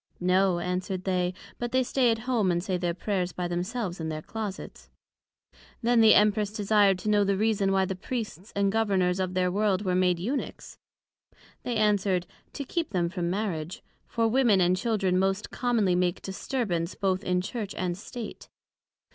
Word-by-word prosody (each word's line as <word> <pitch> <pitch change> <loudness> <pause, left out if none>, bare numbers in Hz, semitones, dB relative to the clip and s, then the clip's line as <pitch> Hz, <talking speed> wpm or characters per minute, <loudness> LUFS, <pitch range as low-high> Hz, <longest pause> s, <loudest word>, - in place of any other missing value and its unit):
No, 185 0 +3
answered 180 +1 -3
they: 180 -2 0 0.3
but 240 0 -3
they 260 0 +3
stay 250 0 +2
at 225 - +2
home, 235 -7 +1
and 175 0 0
say 185 -1 -1
their 175 -1 -1
Prayers 185 -2 -2
by 180 -1 -3
themselves 180 +2 -3
in 160 -1 -3
their 155 -1 -5
Closets. 215 -4 -7 0.9
Then 235 0 +4
the 220 -1 +7
Empress 210 0 +3
desir'd 205 -2 +3
to 215 - -1
know 205 -1 +4
the 200 -1 +1
reason 205 -2 +1
why 190 0 +3
the 190 - -3
Priests 210 -2 -5
and 200 -1 +2
Governors 195 -4 +1
of 185 -1 -2
their 180 -1 +2
World 205 0 +1
were 185 - +1
made 180 -1 +3
Eunuchs? 235 +12 -4 0.8
They 245 - -3
answer'd, 200 -4 +2 0.3
To 285 - -4
keep 330 +4 -2
them 175 -3 0
from 175 -1 -2
Marriage: 180 -4 -3 0.2
For 230 -1 +1
Women 230 -4 +3
and 180 0 +3
Children 195 -3 +1
most 195 +2 0
commonly 230 -7 +1
make 180 -1 0
disturbance 190 -4 -2
both 190 0 0
in 180 -1 +1
Church 205 +2 -4
and 180 -1 -2
State. 225 +3 -8
195 Hz, 175 wpm, -27 LUFS, 180-220 Hz, 0.9 s, the